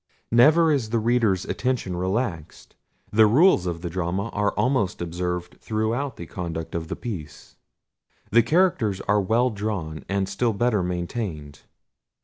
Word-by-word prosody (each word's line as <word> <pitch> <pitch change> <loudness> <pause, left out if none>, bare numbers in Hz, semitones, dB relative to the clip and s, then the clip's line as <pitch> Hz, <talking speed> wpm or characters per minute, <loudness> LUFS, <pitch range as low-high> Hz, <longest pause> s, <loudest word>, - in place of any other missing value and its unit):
Never 155 +8 +5
is 130 -7 0
the 115 - 0
reader's 115 -5 +1
attention 125 -8 -2
relaxed. 90 -3 -3 0.4
The 110 0 +6
rules 125 - +4
of 85 -1 -4
the 85 - -3
drama 95 +4 -2
are 105 -1 0
almost 130 -7 0
observed 90 +1 -4
throughout 115 +6 -2
the 85 - -7
conduct 80 -2 -5
of 80 -1 -3
the - - -4
piece. 90 - -8 0.8
The 115 +3 +6
characters 120 - +2
are 105 0 +2
well 115 +6 +2
drawn, 100 -8 -4
and 100 0 0
still 110 +4 0
better 110 -1 +1
maintained. 85 -4 -4
105 Hz, 140 wpm, -24 LUFS, 90-120 Hz, 0.8 s, The